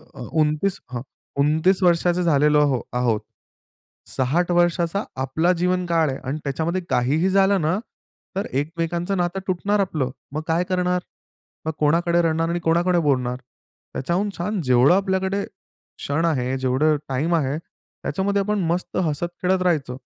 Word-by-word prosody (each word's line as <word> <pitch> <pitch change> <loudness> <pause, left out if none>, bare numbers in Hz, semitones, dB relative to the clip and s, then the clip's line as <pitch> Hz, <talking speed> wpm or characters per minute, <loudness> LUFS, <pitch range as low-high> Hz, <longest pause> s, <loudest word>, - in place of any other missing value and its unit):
अ, - - -9 0.2
29 155 +6 +1
हं, 120 0 -4 0.8
वर्षाचं 175 +1 +3
झालेलो 150 -2 +4
आहो 140 -4 +2 0.2
आहोत. 120 -3 +1 0.9
60 160 +7 0
वर्षाचा 175 +2 +2 0.2
आपला 160 +7 +1
जीवनकाळ 175 -4 +1
आहे 135 - -3
आणि 145 +4 -2
त्याच्यामध्ये 160 +6 -1
काहीही 150 +9 +2
झालं 195 0 +3
ना 160 +4 +1 0.6
तर 195 - -1
एकमेकांचं 170 +6 -2
नातं 175 +2 -1
तुटणार 200 +3 0
आपलं. 155 -9 0 0.2
मग 155 - -2
काय 165 +2 +2
करणार? 180 -1 +1 0.6
मग 160 - 0
कोणाकडे 170 +3 +3
रडणार? 165 0 +1
आणि 175 +1 -1
कोणाकडे 170 +2 +2
बोलणार? 125 -5 +1 0.6
त्याच्याहून 175 +9 -1
छान 190 +3 -2
जेवढं 130 +4 +5
आपल्याकडे 190 0 0
क्षण 155 +4 -5
आहे, 130 -5 0
जेवढं 130 +4 +2
टाईम 155 +6 +1
आहे 145 -1 0
त्याच्यामध्ये 200 +3 -3
आपण 210 0 0
मस्त 180 +1 -2
हसत-खेळत 175 +4 -1
राहायच. 155 -8 +1
170 Hz, 135 wpm, -22 LUFS, 145-180 Hz, 0.9 s, जेवढं